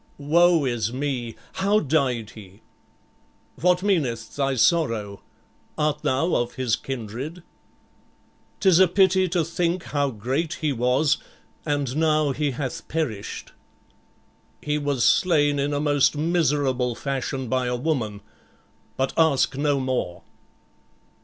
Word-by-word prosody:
"Woe 165 Hz, +2 st, +3 dB
is 120 Hz, -3 st, -1 dB
me! 125 Hz, -3 st, -3 dB, 0.2 s
How 200 Hz, +3 st, +2 dB
died 130 Hz, -, 0 dB
he?" 100 Hz, -1 st, -14 dB, 1.0 s
"What 180 Hz, +2 st, +2 dB
meaneth 130 Hz, -, -1 dB
thy 135 Hz, -1 st, 0 dB
sorrow? 115 Hz, -, +1 dB, 0.6 s
Art 150 Hz, 0 st, 0 dB
thou 150 Hz, +7 st, 0 dB
of 120 Hz, 0 st, -1 dB
his 125 Hz, -4 st, 0 dB
kindred?" 135 Hz, -, -6 dB, 1.2 s
"'Tis 185 Hz, -4 st, +4 dB
a 190 Hz, -, +7 dB
pity 190 Hz, 0 st, +3 dB
to 170 Hz, -2 st, 0 dB
think 170 Hz, +1 st, -1 dB
how 145 Hz, -1 st, -1 dB
great 135 Hz, +9 st, -2 dB
he 155 Hz, -3 st, -1 dB
was, 125 Hz, +4 st, +2 dB, 0.5 s
and 145 Hz, -3 st, -1 dB
now 155 Hz, -2 st, +2 dB
he 145 Hz, +2 st, -1 dB
hath 135 Hz, -1 st, -5 dB
perished." 130 Hz, -11 st, -4 dB, 1.1 s
"He 150 Hz, 0 st, -1 dB
was 140 Hz, -4 st, -1 dB
slain 145 Hz, -5 st, +3 dB
in 140 Hz, +1 st, 0 dB
a 145 Hz, -, -1 dB
most 145 Hz, 0 st, +2 dB
miserable 145 Hz, -6 st, +1 dB
fashion 135 Hz, -1 st, -3 dB
by 130 Hz, +1 st, 0 dB
a 125 Hz, -, -1 dB
woman, 120 Hz, -7 st, -2 dB, 0.8 s
but 135 Hz, 0 st, 0 dB
ask 150 Hz, -4 st, +3 dB
no 145 Hz, 0 st, +1 dB
more." 130 Hz, -9 st, -3 dB
145 Hz, 125 wpm, -24 LUFS, 125-160 Hz, 1.2 s, a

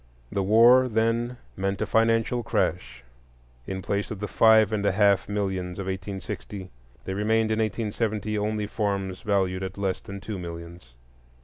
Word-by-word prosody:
The 100 Hz, -, 0 dB
war 120 Hz, +6 st, +6 dB
then 115 Hz, +2 st, 0 dB, 0.2 s
meant 95 Hz, 0 st, -2 dB
a -, -, 0 dB
financial 115 Hz, +2 st, +2 dB
crash; 65 Hz, -, -2 dB, 0.6 s
in 95 Hz, -1 st, -4 dB
place 100 Hz, 0 st, -1 dB
of 105 Hz, -, -6 dB
the 105 Hz, -, -3 dB
five 110 Hz, 0 st, +5 dB
and 105 Hz, -1 st, 0 dB
a 100 Hz, -, +2 dB
half 100 Hz, -1 st, +3 dB
millions 95 Hz, -3 st, -2 dB
of 100 Hz, -, -4 dB
1860, 95 Hz, 0 st, -6 dB, 0.3 s
there 95 Hz, -, -3 dB
remained 110 Hz, +2 st, +1 dB
in 110 Hz, -, 0 dB
1870 110 Hz, 0 st, -1 dB
only 105 Hz, 0 st, -1 dB
farms 100 Hz, -3 st, -2 dB
valued 95 Hz, -4 st, 0 dB
at 95 Hz, +1 st, -5 dB
less 95 Hz, -2 st, -1 dB
than 100 Hz, 0 st, -8 dB
two 100 Hz, -1 st, -6 dB
millions. 85 Hz, -6 st, -9 dB
100 Hz, 155 wpm, -26 LUFS, 95-110 Hz, 0.6 s, war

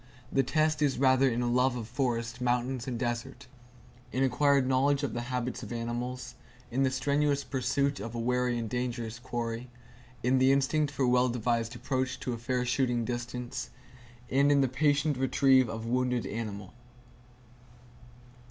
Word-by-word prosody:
The 135 Hz, -, +3 dB
test 155 Hz, +3 st, +1 dB
is 145 Hz, -3 st, +2 dB
rather 130 Hz, 0 st, +4 dB
in 120 Hz, 0 st, -1 dB
a -, -, 0 dB
love 125 Hz, +1 st, +2 dB
of 115 Hz, -3 st, -5 dB
forest, 120 Hz, -1 st, -2 dB
mountains 125 Hz, 0 st, 0 dB
and 125 Hz, -2 st, -2 dB
desert; 120 Hz, +3 st, -3 dB, 0.7 s
in 130 Hz, -, +1 dB
acquired 135 Hz, +1 st, +3 dB
knowledge 135 Hz, +2 st, +2 dB
of 140 Hz, -, -2 dB
the 120 Hz, -, -2 dB
habits 125 Hz, 0 st, -2 dB
of -, -, -8 dB
animals; 120 Hz, +2 st, -4 dB, 0.4 s
in 130 Hz, +3 st, 0 dB
the 135 Hz, -, +3 dB
strenuous 140 Hz, +2 st, +1 dB
pursuit 140 Hz, +1 st, 0 dB
of 115 Hz, +3 st, -6 dB
a -, -, -2 dB
wary 125 Hz, +1 st, +1 dB
and 115 Hz, -1 st, -3 dB
dangerous 120 Hz, -1 st, -3 dB
quarry; 120 Hz, 0 st, -4 dB, 0.5 s
in 130 Hz, +2 st, +3 dB
the 130 Hz, +1 st, +5 dB
instinct 140 Hz, +2 st, +2 dB
for 140 Hz, -, -1 dB
a -, -, +3 dB
well 125 Hz, +1 st, +3 dB
devised 120 Hz, 0 st, -1 dB
approach 130 Hz, +1 st, -2 dB
to 125 Hz, -, -2 dB
a 115 Hz, -, -5 dB
fair 125 Hz, +1 st, -1 dB
shooting 125 Hz, -2 st, +1 dB
distance; 120 Hz, 0 st, -4 dB, 0.6 s
and 140 Hz, +2 st, +4 dB
in 140 Hz, -1 st, +4 dB
the 135 Hz, -, +3 dB
patient 145 Hz, +2 st, +1 dB
retrieve 130 Hz, -1 st, +4 dB
of 110 Hz, 0 st, -5 dB
a -, -, -5 dB
wounded 125 Hz, 0 st, 0 dB
animal." 105 Hz, -3 st, -5 dB
125 Hz, 170 wpm, -29 LUFS, 120-135 Hz, 0.7 s, the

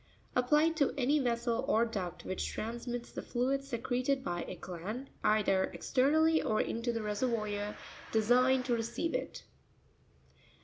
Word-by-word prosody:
—Applied 300 Hz, +6 st, +3 dB
to 285 Hz, -3 st, +2 dB
any 280 Hz, +3 st, +3 dB
vessel 235 Hz, -2 st, 0 dB
or 230 Hz, -4 st, +4 dB
duct 195 Hz, -7 st, -5 dB
which 185 Hz, -, -2 dB
transmits 240 Hz, +2 st, -4 dB
the -, -, -5 dB
fluid 265 Hz, +3 st, 0 dB
secreted 255 Hz, +1 st, -1 dB
by 175 Hz, -4 st, -2 dB
a -, -, -5 dB
gland, 205 Hz, +10 st, -6 dB
either 195 Hz, -3 st, +3 dB
exter. 260 Hz, +1 st, +2 dB
nally 315 Hz, +1 st, +4 dB
or 215 Hz, -, +1 dB
into 230 Hz, +1 st, -1 dB
the 230 Hz, -1 st, -2 dB
reseryoir 210 Hz, -1 st, -1 dB, 0.4 s
designed 250 Hz, +4 st, +4 dB
to 250 Hz, -, +1 dB
receive 235 Hz, +8 st, -1 dB
it. -, -, -3 dB
240 Hz, 140 wpm, -32 LUFS, 215-265 Hz, 0.4 s, or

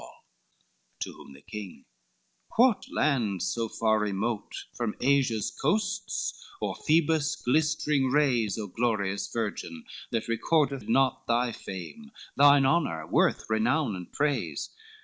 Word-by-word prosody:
XLVII -, -, -12 dB, 0.9 s
To -, -, -4 dB
whom 70 Hz, -, -14 dB
the 70 Hz, -, -15 dB
king, 100 Hz, -8 st, -8 dB, 0.7 s
"What 245 Hz, -2 st, +4 dB
land 115 Hz, -, +1 dB
so 115 Hz, -1 st, -1 dB
far 110 Hz, 0 st, +1 dB
remote 105 Hz, +2 st, -3 dB
From 120 Hz, -3 st, -3 dB
Asia's 130 Hz, -5 st, +2 dB
coasts, 195 Hz, +5 st, -1 dB, 0.2 s
or -, -, -2 dB
Phoebus' 155 Hz, -1 st, +2 dB
glistering 150 Hz, 0 st, +1 dB
rays, 125 Hz, -8 st, +2 dB
O 110 Hz, -, -3 dB
glorious 100 Hz, -2 st, -1 dB
virgin, 105 Hz, -7 st, -4 dB, 0.2 s
that 115 Hz, -1 st, -2 dB
recordeth 140 Hz, +1 st, +1 dB
not 130 Hz, +2 st, +2 dB
Thy 120 Hz, +1 st, +2 dB
fame, 110 Hz, -, -8 dB, 0.3 s
thine 140 Hz, -1 st, +6 dB
honor, 130 Hz, -, +1 dB
worth, -, -, +2 dB
renown, 110 Hz, +2 st, +1 dB
and 90 Hz, -1 st, -9 dB
praise? 145 Hz, -1 st, -1 dB
120 Hz, 125 wpm, -28 LUFS, 105-145 Hz, 0.9 s, thine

